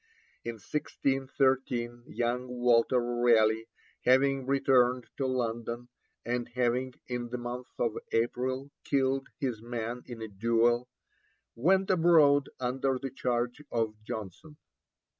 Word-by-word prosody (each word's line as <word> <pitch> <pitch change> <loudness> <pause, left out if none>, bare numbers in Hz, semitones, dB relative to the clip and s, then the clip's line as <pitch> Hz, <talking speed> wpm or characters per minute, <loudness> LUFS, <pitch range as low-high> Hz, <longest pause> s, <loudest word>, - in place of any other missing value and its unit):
In 115 - -3
1613 130 -1 -1
young 120 +1 -1
Walter 125 0 +3
Raleigh, 115 -2 +3 0.4
having 135 +1 +3
returned 130 -2 +3
to 135 - 0
London, 120 -1 -2 0.4
and 120 0 -2
having, 125 +1 0
in 120 -1 -3
the 125 - -3
month 120 +1 -5
of 115 -2 0 0.2
April, 130 +4 -1
killed 135 -1 +1
his 125 -7 -2
man 120 +1 -4
in 120 -2 -8
a - - -4
duel, 115 +4 +2 0.7
went 190 +10 +3
abroad 160 -6 +5
under 130 +1 0
the 135 -1 -5
charge 125 +1 -1
of 115 -2 0
Jonson. 110 - -7
125 Hz, 115 wpm, -30 LUFS, 120-135 Hz, 0.7 s, abroad